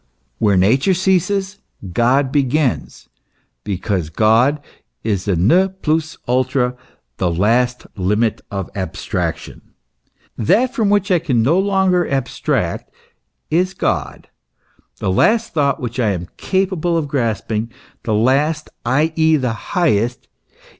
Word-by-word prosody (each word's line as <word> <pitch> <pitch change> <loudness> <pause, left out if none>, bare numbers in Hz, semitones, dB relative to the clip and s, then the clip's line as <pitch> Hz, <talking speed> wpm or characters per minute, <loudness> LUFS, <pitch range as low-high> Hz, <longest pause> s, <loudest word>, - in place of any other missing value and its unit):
"Where 100 -3 +3
Nature 130 - +3
ceases, 190 +2 0 0.3
God 130 +6 +2
begins," 140 -1 0 0.6
because 95 -4 -2
God 115 - +3 0.4
is 100 -4 -1
the 100 -3 +1
ne 145 - +4
plus 160 -4 -2
ultra, 125 0 +1 0.4
the 90 - 0
last 115 +8 +1
limit 105 +4 0
of 95 -3 -5
abstraction. 95 -2 -4 0.7
That 235 - +2
from 225 -6 +1
which 205 0 +1
I 180 - +4
can 125 -8 +1
no 160 +10 +3
longer 190 -3 +2
abstract 135 -3 -2 0.6
is 185 +4 +1
God, - - -2 0.7
the 95 - -1
last 220 - +2
thought 140 -3 +1
which 120 0 -5
I 115 -4 +2
am 90 0 -6
capable 185 -3 0
of 155 -3 -1
grasp 120 -7 -2
ing 110 +2 -2 0.3
the 110 - -1
last, 145 +7 +1
i.e., 160 +5 +2
the 130 -6 0
highest. 120 - -1
135 Hz, 120 wpm, -18 LUFS, 110-175 Hz, 0.7 s, ne